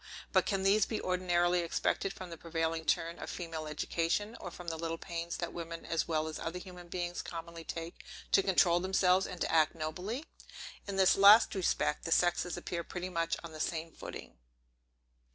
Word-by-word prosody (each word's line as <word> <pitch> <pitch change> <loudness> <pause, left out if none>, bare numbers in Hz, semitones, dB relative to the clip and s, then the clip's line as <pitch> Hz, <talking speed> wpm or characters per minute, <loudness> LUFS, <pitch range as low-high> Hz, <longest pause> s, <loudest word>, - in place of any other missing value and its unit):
But - - +4
can 195 -3 0
these 200 +1 +4
be 220 - -2
ordinarily 180 -1 +2
expected 175 +3 0
from 185 -2 -9
the - - -5
prevailing 165 0 -2
turn 165 +2 0
of - - -6
female 165 -3 -5
education; 170 +8 -1
or 180 - -6
from 175 0 -11
the 165 - -3
little 165 0 -3
pains 170 0 -4
that 170 - -4
women, 165 -1 -6
as 165 - 0
well 155 -1 0
as 155 - -5
other 165 +2 -4
human 180 -1 -10
beings, 175 0 -3
commonly 165 0 -7
take 165 +1 -6 0.3
to - - +6
control 175 -2 +4
themselves, 185 0 +3
and 180 - -7
to - - 0
act 160 -1 +4
nobly? 180 - -4 0.6
In 200 - -3
this 190 -1 +5
last 200 +3 +8
respect, 180 -5 0
the 165 - -3
sexes 175 +1 +2
appear 170 -1 -4
pretty 180 +1 -5
much 165 -2 0
on 170 - -7
the 155 - -9
same 165 +1 -2
footing. - - -9
175 Hz, 190 wpm, -32 LUFS, 165-185 Hz, 0.6 s, last